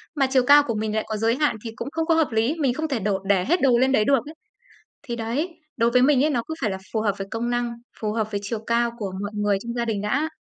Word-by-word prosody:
Mà 275 -3 +2
chiều 260 -2 +4
cao 290 0 +8
của 230 - -1
mình 215 0 -2
lại 220 - 0
có 220 -1 -3
giới 225 +2 +1
hạn 295 -4 +1
thì 225 - -5
cũng 235 - -6
không 325 0 -1
có 330 0 +3
hợp 320 -4 +2
lý, 225 +7 +1
mình 270 -5 +2
không 315 +4 -2
thể 270 -6 -1
đổ 200 -1 0
để 195 -2 +2
hết 345 +4 +1
đồ 255 -3 +4
lên 260 +2 +3
đấy 215 -5 +3
được 275 +1 +4
ấy. 305 - -9 0.7
Thì 235 - -5
đấy, 235 +9 -2 0.3
đối 230 -1 +2
với 250 +1 +4
mình 275 0 +4
ấy, 310 - +2
nó 240 -5 0
cứ 320 - -4
phải 215 - 0
là 190 - -4
phù 220 - 0
hợp 210 -2 +1
với 195 - -4
công 235 +1 -2
năng, 240 -1 -1 0.3
phù 215 -1 -1
hợp 220 -1 -2
với 205 -1 -2
chiều 215 +3 -3
cao 235 0 +2
của 200 -4 -4
mọi 205 - -3
người 205 -1 +1
trong 235 0 -4
gia 240 -1 -1
đình 215 -3 -2
đã. 275 +10 0
235 Hz, 305 wpm, -23 LUFS, 215-275 Hz, 0.7 s, cao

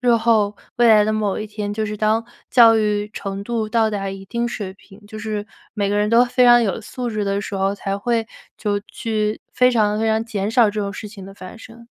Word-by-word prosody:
日 245 -1 +3
后、 220 -3 +2 0.2
未 240 -1 +5
来 215 -2 +6
的 215 - 0
某 210 -2 -1
一 215 - -4
天， 210 -1 -5
就 215 +1 -2
是 210 0 -4
当 215 +2 +1 0.3
教 230 -2 +7
育 210 -1 0
程 195 0 -5
度 225 -1 -2
到 225 -1 +2
达 200 -2 -3
一 195 0 -8
定 235 +4 -2
水 205 -5 -6
平， 195 +1 -18
就 215 - -10
是 215 -1 -4 0.3
每 205 -2 -1
个 205 - 0
人 210 +1 +1
都 235 +2 +6
非 250 +1 +2
常 240 0 +7
有 195 0 -2
素 245 +3 -5
质 215 -2 -2
的 200 0 -1
时 205 - -6
候， 195 0 0
才 195 0 -3
会 225 +2 -1 0.3
就 205 -2 -1
去 215 -1 -2
非 250 0 +4
常 215 -3 +1
非 225 - +1
常 220 0 +1
减 205 -3 -3
少 235 +1 +5
这 210 +1 -3
种 200 -1 -3
事 210 +2 -7
情 200 -2 -11
的 195 - -10
发 185 +2 -11
生。 230 +1 -14
215 Hz, 260 characters per minute, -20 LUFS, 205-225 Hz, 0.3 s, 教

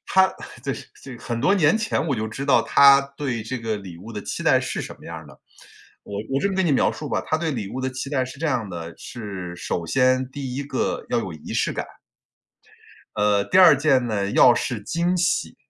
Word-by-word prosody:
她 190 0 +4 0.3
这 - - -1 0.3
这 130 -3 -9
很 120 -1 -4
多 195 +10 +3
年 160 -1 +4
前 220 -6 -1
我 140 - 0
就 110 -1 -3
知 135 +5 -5
道， 140 - +4
她 140 0 +7 0.2
对 125 -6 -3
这 130 +4 -4
个 115 -2 -2
礼 95 -4 -9
物 110 +5 -10
的 105 -2 -6
期 - - -5
待 - - +4
是 - - -3
什 - - -7
么 - - -16
样 - - -7
儿 - - -10
的。 - - -16 0.7
我 100 0 -6 0.2
我 135 - +2
这 200 - +1
么 195 - -3
跟 190 -2 +2
你 150 - +2
描 - - +3
述 150 - -7
吧， - - 0
她 155 - 0
对 165 -1 -1
礼 110 -7 -4
物 130 - -4
的 130 - -1
期 130 +2 -6
待 130 -3 +1
是 130 +2 -10
这 165 - -1
样 125 -8 -1
的， 85 -2 -7
是 95 -7 -7
首 85 -1 -3
先， 130 +1 +2
第 130 -2 -6
1 140 - -2
个， 140 - -2
要 - - +1
有 - - -4
仪 80 - -8
式 - - +1
感。 - - -4 1.3
呃， 105 -1 +2
第 185 - +2
2 180 -6 +8
件 135 -3 +2
呢， 100 -3 -1
要 120 -2 +7
是 120 -3 -2
惊 170 - 0
喜。 175 -2 0
130 Hz, 245 characters per minute, -23 LUFS, 110-145 Hz, 1.3 s, 2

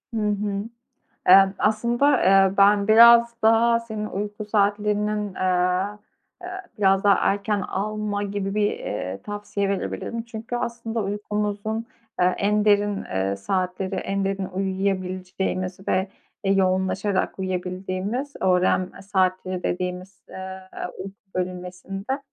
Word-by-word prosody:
Hı 220 - 0
hı. 205 -1 -1 0.7
Eee, 195 +1 +8
aslında, 240 +6 +2
eee, 195 0 +5
ben 200 0 +5
biraz 235 +1 +8
daha 230 +1 +4
senin 215 -2 -5
uyku 210 +1 -5
saatlerinin, 210 0 0
eee, 180 0 +1 0.6
eee, 360 - -6 0.3
biraz 195 -1 +3
daha 200 -1 +6 0.2
erken 205 +1 -1
alma 210 +1 -2
gibi 200 -1 -3
bir, 210 -1 +2
eee, 95 -1 -5
tavsiye 205 -1 -3
verebilirim 230 +3 -3
çünkü 230 +1 -6
aslında 235 -1 -3
uykumuzun, 210 +2 -3 0.3
eee, 180 0 +3
en 210 +1 +2
derin, 205 -1 +2
eee, 95 +1 -2
saatleri, 185 - -2
en 195 0 -2
derin 195 0 -2
uyuyabileceğimiz 185 -1 -2
ve, 190 +1 +1 0.4
eee, 195 - +3
yoğunlaşarak 190 +1 0
uyuyabildiğimiz, 185 +7 -3
"öğrenme 185 0 +1
saatleri" 185 -2 0
dediğimiz, 180 +1 -4
eee, 190 0 -7 0.4
uyku 195 0 -7 0.2
bölünmesinde, 185 +6 -4
195 Hz, 115 wpm, -24 LUFS, 185-210 Hz, 0.7 s, Eee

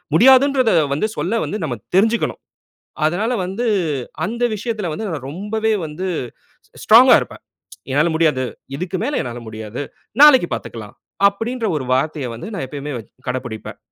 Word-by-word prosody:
முடியாதுன்றதை 260 - +5 0.2
வந்து 215 +10 0
சொல்ல 230 0 0
வந்து 210 - -4
நம்ம 120 -5 -3 0.2
தெரிஞ்சுக்கணும். 225 +3 +1 0.7
அதனால 205 +9 0
வந்து, 200 +7 -3 0.6
அந்த 235 +2 -4
விஷயத்தில 215 -4 -3
வந்து, 220 +7 -4
நான் 140 -5 -5
ரொம்பவே 215 +6 -1
வந்து 165 +5 -5 0.6
ஸ் - - -51
ஸ்ட்ராங்கா - - +8
இருப்பேன். - - -9 0.5
"என்னால 150 +5 +3
முடியாது. 150 -6 +2 0.3
இதுக்கு 180 +3 -3
மேல 285 +2 -1
என்னால 120 -1 -6
முடியாது. 110 +4 -6 0.4
நாளைக்கு 265 -11 +8
பார்த்துக்கலாம்." 105 -3 -8 0.3
அப்படின்ற 225 +3 -3
ஒரு 130 - -3
வார்த்தையை 140 0 -1
வந்து 120 - -7
நான் 155 -9 -3
எப்பயுமே 145 0 -6
வ - - -4 0.3
கடைபுடிப்பேன். 125 -3 -5
180 Hz, 140 wpm, -19 LUFS, 135-225 Hz, 0.7 s, ஸ்ட்ராங்கா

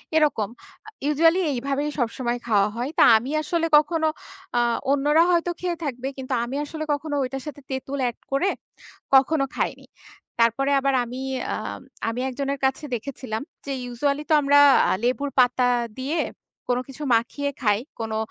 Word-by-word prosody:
এরকম 295 -10 +2 0.4
আ - - -7 0.2
ইউজুয়ালি 325 +4 +4
এইভাবেই 275 +3 -1
সবসময় 240 0 -1
খাওয়া 205 -3 +3
হয়। 245 +3 -2
তা - - +8
আমি 245 +5 -4
আসলে 330 +2 -1
কখনো, 315 +1 +2 0.5
আ - - +4 0.3
অন্যরা 295 +3 +4
হয়তো 345 0 +2
খেয়ে 355 -1 -2
থাকবে 260 -3 -3
কিন্তু 265 0 -4
আমি 240 +3 -4
আসলে 310 +1 -5
কখনো 290 +1 -3
ঐটার 265 +1 -4
সাথে 285 -1 -7
তেঁতুল 265 +1 -4
এড 235 - -10
করে 275 +8 +2 0.7
কখনো 275 +2 +4
খাইনি। - - -2 0.5
তারপরে 235 +5 +2
আবার 275 0 +1
আমি 245 +2 -7 0.3
আ - - -1 0.5
আমি 230 +2 -4
একজনের 275 +1 -3
কাছে 265 +3 0
দেখেছিলাম 235 -2 -5 0.2
যে 280 - -4
ইউজুয়ালি 280 +4 -1
তো - - +4
আমরা 285 0 +5 0.4
লেবুর 275 +3 0
পাতা 250 0 +4 0.3
দিয়ে 290 +6 -1 0.5
কোনো 245 0 +1
কিছু 275 +2 -8
মাখিয়ে 285 +5 -1
খাই। 210 -4 +3 0.2
কোনো 220 -1 -2
275 Hz, 155 wpm, -24 LUFS, 245-295 Hz, 0.7 s, তা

